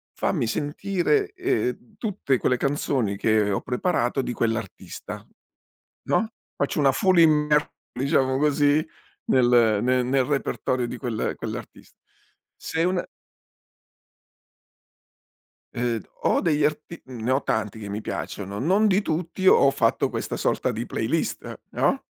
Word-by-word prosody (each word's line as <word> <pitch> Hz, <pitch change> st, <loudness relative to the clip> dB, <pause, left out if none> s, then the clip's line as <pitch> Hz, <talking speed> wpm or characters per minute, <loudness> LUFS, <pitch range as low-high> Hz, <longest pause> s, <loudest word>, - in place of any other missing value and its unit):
fammi -, -, 0 dB
sentire, 195 Hz, -, 0 dB
ehm, 370 Hz, -, -2 dB
tutte 195 Hz, -, -1 dB
quelle 125 Hz, +1 st, +1 dB
canzoni 130 Hz, -7 st, 0 dB
che 110 Hz, -1 st, +2 dB
ho -, -, -1 dB
preparato 125 Hz, -1 st, 0 dB
di 125 Hz, -, -3 dB
quell'artista, 115 Hz, -1 st, -4 dB, 0.9 s
no, 220 Hz, -, +2 dB, 0.3 s
faccio 140 Hz, +2 st, -1 dB
una 135 Hz, -1 st, +5 dB
full 185 Hz, +2 st, +3 dB
immer 150 Hz, -2 st, +4 dB, 0.2 s
diciamo 130 Hz, 0 st, +1 dB
così, 145 Hz, +1 st, +3 dB, 0.4 s
nel 120 Hz, -4 st, +4 dB
ne 125 Hz, 0 st, +2 dB
nel 130 Hz, +1 st, +1 dB
repertorio 130 Hz, -3 st, -1 dB
di 125 Hz, -, -5 dB
quel 120 Hz, -5 st, -2 dB
quell'artist -, -, -8 dB, 0.6 s
Se 160 Hz, -, -2 dB
una 180 Hz, -1 st, 0 dB, 2.7 s
Ehm, 120 Hz, -3 st, -1 dB, 0.2 s
ho -, -, +2 dB
degli 150 Hz, -3 st, +1 dB
arti 155 Hz, +3 st, -2 dB
ne 125 Hz, -1 st, -4 dB
ho 135 Hz, +1 st, +1 dB
tanti 110 Hz, 0 st, -2 dB
che 105 Hz, -, -7 dB
mi 105 Hz, +2 st, -4 dB
piacciono, 100 Hz, -1 st, -5 dB
non 195 Hz, +9 st, +3 dB
di 195 Hz, +1 st, +3 dB
tutti 175 Hz, +2 st, -3 dB
ho 140 Hz, -, +7 dB
fatto 115 Hz, -4 st, +1 dB
questa -, -, -4 dB
sorta -, -, 0 dB
di -, -, -4 dB
playlist, -, -, -2 dB
no. -, -, +1 dB
135 Hz, 125 wpm, -24 LUFS, 120-160 Hz, 2.7 s, ho